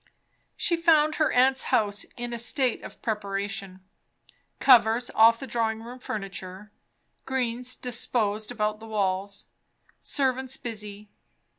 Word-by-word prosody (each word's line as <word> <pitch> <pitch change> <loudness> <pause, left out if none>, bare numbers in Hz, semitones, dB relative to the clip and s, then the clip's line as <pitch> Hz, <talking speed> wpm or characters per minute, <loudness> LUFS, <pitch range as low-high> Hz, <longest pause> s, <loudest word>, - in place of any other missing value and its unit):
She 340 - +1
found 310 -2 +4
her 310 - +3
aunt's 260 +1 +3
house 205 -2 +1
in 240 0 -4
a 235 - -3
state 250 +1 0
of - - -11
preparation; 200 -3 -3 0.8
covers 240 -2 +5
off 230 +1 +6
the - - -6
drawing 225 -2 -1
room 245 +2 -9
furniture, 195 -2 -6 0.6
greens 250 -1 -2
disposed 220 -3 -1
about 215 -2 -1
the 225 - -11
walls, 200 -1 -2 0.5
servants 265 -1 -1
busy. 210 -3 -7
225 Hz, 120 wpm, -26 LUFS, 205-250 Hz, 0.8 s, off